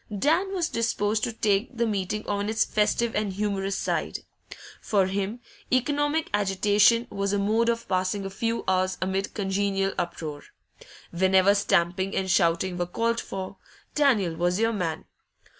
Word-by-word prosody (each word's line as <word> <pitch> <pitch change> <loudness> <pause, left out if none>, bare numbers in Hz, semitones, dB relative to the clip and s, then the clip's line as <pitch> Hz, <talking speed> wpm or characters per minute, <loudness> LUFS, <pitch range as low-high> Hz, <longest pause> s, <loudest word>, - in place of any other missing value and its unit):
Dan 315 - +1
was 360 -4 0
disposed 220 - 0
to 240 - -3
take 220 +3 0
the 235 - +2
meeting 210 0 -2
on 205 0 -1
its 220 0 +2
festive 215 +2 0
and 210 -2 -1
humorous 195 -1 -1
side; - - -2 0.6
for 200 -3 +2
him, 200 +5 -3 0.3
economic 290 +4 +1
agitation 205 +3 +3
was 200 0 -1
a - - +2
mode 220 +4 +2
of 230 0 -2
passing 185 +1 -1
a 195 - -5
few 230 +3 -2
hours 185 0 +1
amid 190 +1 -2
congenial 195 -1 0
uproar. 155 -4 -4 0.7
Whenever 190 +2 +4
stamping 190 -1 +1
and 190 -1 0
shouting 175 0 +2
were 175 - -1
called 230 +5 0
for, 190 0 -6 0.4
Daniel 235 - +2
was 175 +3 0
your 225 +1 +2
man. 175 -6 -3
200 Hz, 150 wpm, -26 LUFS, 190-225 Hz, 0.7 s, Whenever